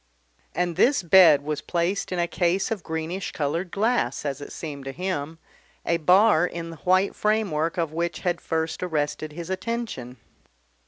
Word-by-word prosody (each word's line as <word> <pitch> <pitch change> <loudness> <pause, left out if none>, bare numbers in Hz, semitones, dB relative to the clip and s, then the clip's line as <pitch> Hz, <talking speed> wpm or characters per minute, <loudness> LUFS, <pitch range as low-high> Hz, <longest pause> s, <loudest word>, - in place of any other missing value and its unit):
And 175 -2 -1
this 265 -5 +3
bed 165 -5 +7
was 150 0 -3
placed 175 +4 -1
in 180 - -2
a 175 - +2
case 175 +4 0
of 215 -4 -2
greenish 160 +4 -4
coloured 165 +4 -2
glass 220 -2 0
(as 140 -1 -3
it - - -8
seemed 145 -4 -7
to 135 - -4
him), 165 -2 -4 0.5
a 170 - +2
bar 180 +1 +5
in 165 -1 -6
the 165 - -10
white 185 +5 +2
framework 195 -7 0
of 165 -3 -1
which 170 0 -2
had 175 -2 -1
first 160 -1 -2
arrested 155 -3 -2
his 170 +3 -6
attention. 190 - -4
170 Hz, 165 wpm, -25 LUFS, 155-190 Hz, 0.5 s, bed